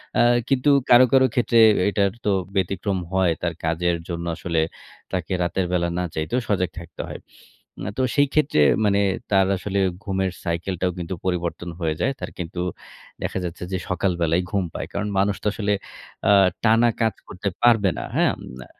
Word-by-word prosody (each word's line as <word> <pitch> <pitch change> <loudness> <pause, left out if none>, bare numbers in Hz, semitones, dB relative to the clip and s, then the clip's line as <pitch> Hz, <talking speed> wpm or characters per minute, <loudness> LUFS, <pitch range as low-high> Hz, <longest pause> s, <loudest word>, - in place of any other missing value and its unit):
অ্যা - - +5 0.3
কিন্তু 135 +2 +2 0.2
কারো, 125 +1 +8
কারো 130 -1 +6
ক্ষেত্রে 120 -1 +3 0.3
এটার 100 -1 +1
তো 105 - +3 0.2
ব্যতিক্রম 95 +1 0 0.2
হয় 95 -3 +3
তার 85 -1 -1
কাজের 85 +2 +1
জন্য 85 0 -4
আসলে 85 -2 0 0.5
তাকে 90 0 -2
রাতের 90 +2 -1
বেলা 85 -1 +1
না 90 - 0
চাইতেও 80 +11 -1
সজাগ 90 -3 +1
থাকতে 85 - -8
হয়। - - -7 0.6
অ্যা 100 - -3
তো 130 - +1
সেই 145 -1 +4
ক্ষেত্রে 150 - +3 0.2
মানে 100 0 +3 0.3
তার 95 -1 +4
আসলে 100 +1 -2 0.2
ঘুমের 95 -2 -1
সাইকেলটাও 90 +1 -1
কিন্তু 85 0 -4
পরিবর্তন 90 -1 -2
হয়ে 80 -2 -1
যায়। 135 - +1
তার - - -5
কিন্তু 90 0 -4 0.6
দেখা - - -2
যাচ্ছে, 85 0 -5
যে, 95 - 0
সকাল 95 +1 +1
বেলাই 85 +2 +2
ঘুম 100 -2 +1
পায়। - - -5
কারণ 105 +1 -2
মানুষ 100 +1 +2
তো - - 0
আসলে 105 -1 0 0.6
আ - - +7 0.3
টানা 115 +1 +5
কাজ 110 -2 +2
করতে 100 +2 -3
পারবে 115 -5 +5
না। - - -3
হ্যাঁম - - +2 0.2
না - - -10
95 Hz, 175 wpm, -23 LUFS, 85-105 Hz, 0.6 s, কারো